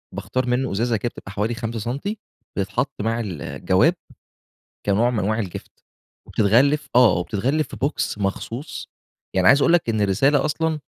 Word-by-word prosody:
باختار 130 0 -2
منه 125 +1 0
إزازة 115 +3 +1
كده 120 - -2
بتبقى 100 - -9
حوالي 105 +3 -1
5 115 -1 -4
سنتي 140 - -3 0.4
بتتحط 120 +7 -2
مع 115 +2 0
الجواب، 95 -10 +1 0.9
كنوع 105 +4 +3
من 120 - -1
أنواع 110 +3 0
الgift 90 - -10 0.4
وبتتغلف 140 +8 +3
آه، 125 -6 +7
وبتتغلف 120 - 0
في - - -9
box 145 - -2
مخصوص. 115 +8 -4 0.5
يعني 90 -1 +4
عايز 140 +1 +6
أقول 170 - +4
لَك 170 -8 +3
إن 110 -2 0
الرسالة 135 +9 +3
أصلًا، 160 +1 0
120 Hz, 155 wpm, -22 LUFS, 105-140 Hz, 0.9 s, آه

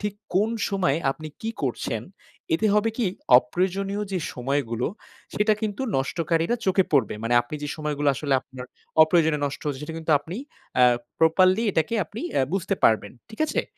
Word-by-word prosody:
ঠিক 210 -1 -3 0.2
কোন 205 +4 +3 0.2
সময় 185 -8 +1
আপনি 155 +3 -7
কি 225 - -3
করছেন, 115 -4 -2 0.5
এতে 215 +7 +1
হবে 210 +2 +3
কি 235 -5 +1 0.3
অপ্রয়োজনীয় 190 +9 -2
যে 185 - 0 0.2
সময়গুলো 125 -2 -1 0.5
সেটা 210 +1 +3
কিন্তু 210 +3 -2
নষ্টকারীরা 165 - 0
চোখে 190 0 +3
পড়বে। 130 -9 +3
মানে 120 - +1
আপনি 120 - -8
যে 145 - -3
সময়গুলো 150 -2 -1
আসলে 140 0 -2
আপনার 130 -1 -10 0.4
অপ্রয়োজনে 160 -1 +3
নষ্ট 140 - -5
হচ্ছে 145 -1 -3
সেটা 160 +2 -6
কিন্তু 160 -1 0
আপনি 165 +5 -7 0.4
অ্যা 125 - +7 0.3
প্রপারলি 185 +6 +4
এটাকে 160 +4 0
আপনি 205 +8 -8
এ্যা - - +3
বুঝতে 195 +1 0
পারবেন। 110 -2 +3 0.2
ঠিক 220 - -2
আছে? - - 0
160 Hz, 165 wpm, -25 LUFS, 135-195 Hz, 0.5 s, অ্যা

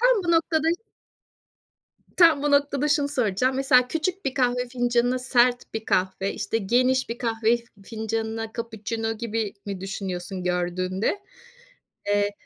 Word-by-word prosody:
Tam - - +5
bu 340 - +1
noktada 325 -1 +2
ş 345 +5 -1 1.3
Tam 330 -5 +6
bu 295 - +1
noktada 285 0 +2
şunu 290 -1 +2
soracağım. 255 -1 0
Mesela 255 -2 +4
küçük 350 +6 -2
bir 265 - -2
kahve 250 -2 +1
fincanına 245 0 +1
sert 245 -2 +1
bir 220 0 -3
kahve, 190 +1 0
işte 215 +2 -2
geniş 255 +5 +2
bir 230 +1 -5
kahve 230 -1 +1 0.3
fincanına 225 +1 -3
cappuccino 225 -1 -3
gibi 225 -2 -3
mi 195 -2 -5
düşünüyorsun 190 -1 -5
gördüğünde? 185 - -1 0.9
Eee, 205 0 +2
235 Hz, 135 wpm, -25 LUFS, 205-270 Hz, 1.3 s, Tam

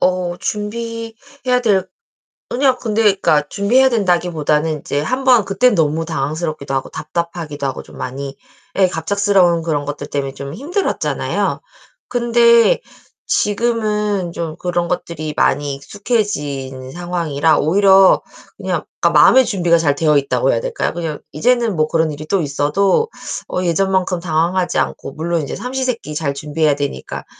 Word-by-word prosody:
어 180 -1 0
준비해야 230 +4 -3
될 195 -5 +2 0.6
아니요 260 0 +2
근데 220 -1 0
그러니까 185 -8 +3
준비해야 250 +7 +3
된다기보다는 165 - +1
이제 145 - -2
한번 255 - +3
그땐 205 +5 +2
너무 160 0 +1
당황스럽기도 155 -1 -3
하고 135 0 -2
답답하기도 160 -2 -4
하고 135 - -5
좀 - - -15
많이 135 +2 -6 0.4
예, 190 - +5
갑작스러운 180 0 +2
그런 150 -3 -1
것들 145 0 -5
때문에 135 -1 -3
좀 140 +1 -7
힘들었잖아요. 330 - -2 0.5
근데 235 - +4 0.5
지금은 210 -4 0
좀 165 -2 -5
그런 175 -1 -1
것들이 160 -3 -4
많이 145 0 +1
익숙해진 140 - -3
상황이라 165 -4 0
오히려 190 +4 +5 0.4
그냥 - - -3 0.2
그러니까 - - +5
마음의 260 0 +6
준비가 175 -5 +2
잘 145 -4 +1
되어 150 0 +3
있다고 140 -1 +1
해야 - - 0
될까요? - - -2
그냥 165 -3 -4
이제는 235 - +1
뭐 155 -1 +2
그런 160 -1 +1
일이 150 +2 -8
또 195 +4 +1
있어도 155 - +1 0.4
어 180 - -2
예전만큼 185 0 +1
당황하지 175 +2 0
않고 130 - -3
물론 165 +1 -1
이제 140 - -5
삼시 255 +4 -3
세끼 230 -12 -3
잘 150 -2 -1
준비해야 150 +1 0
되니까. 140 - -5
175 Hz, 350 characters per minute, -18 LUFS, 150-210 Hz, 0.6 s, 마음의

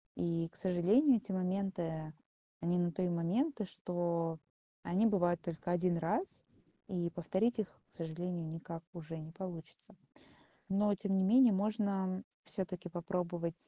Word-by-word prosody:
И, 165 -1 0
к - - -26
сожалению, 200 - +4
эти 205 - -6
моменты- 180 -4 -1 0.5
они 175 +2 +2
на 175 -1 +2
то 185 - -3
и 180 - +2
моменты, 210 - +1
что 170 -3 -1 0.4
они 190 +6 +2
бывают 175 -5 +3
только 170 0 -4
1 175 0 +2
раз, 170 - +1 0.6
и 175 -2 -1
повторить 190 +8 0
их, 210 - +1 0.2
к - - -20
сожалению, 170 +1 -3
никак 165 +1 -6
уже 165 -2 -6
не 155 0 -8
получится. 170 -3 -8 0.8
Но, 205 +1 +3
тем 200 0 -1
не - - +3
менее, 240 +4 +7
можно 195 -2 0 0.2
всё-таки 180 -3 -4
попробовать 175 -1 -2
180 Hz, 140 wpm, -35 LUFS, 170-195 Hz, 0.8 s, менее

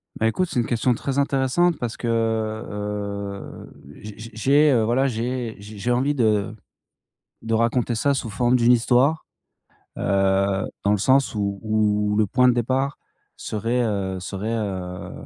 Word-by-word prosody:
Bah, 110 - +1
écoute, 180 +11 0
c'est - - 0
une 120 - +1
question 120 +2 +1
très 135 +3 -2
intéressante, 140 +5 +2
parce 120 -4 -4
que, 120 - -5
heu 115 - +1 0.6
heu, 100 -1 -5 0.3
j 105 -1 -9
j 115 +1 -9
j'ai, 140 +7 +4
heu, 120 -4 +3
voilà, 125 +5 +2
j'ai 120 -1 -3
j'ai 105 +1 -11
j'ai 120 +5 -1
envie 135 +4 +1
de 110 -4 +1 0.9
de 115 0 -3
raconter 115 +1 +1
ça 140 +5 +1
sous 130 -4 -3
forme 120 +4 +1
d'une 120 0 +4
histoire. 125 +6 +3 0.7
Heu, 95 0 +1 0.2
dans 100 - +3
le - - +3
sens 130 +5 +2
où 100 -1 -2
où 105 -1 +1
où - - 0
le 110 - +3
point 125 +6 +3
de 125 - +4
départ 130 +4 -1 0.4
serait, 115 +3 -2
heu, 95 -4 -2
serait, 100 +5 -4
heu, 95 -4 -4
115 Hz, 170 wpm, -23 LUFS, 105-125 Hz, 0.9 s, j'ai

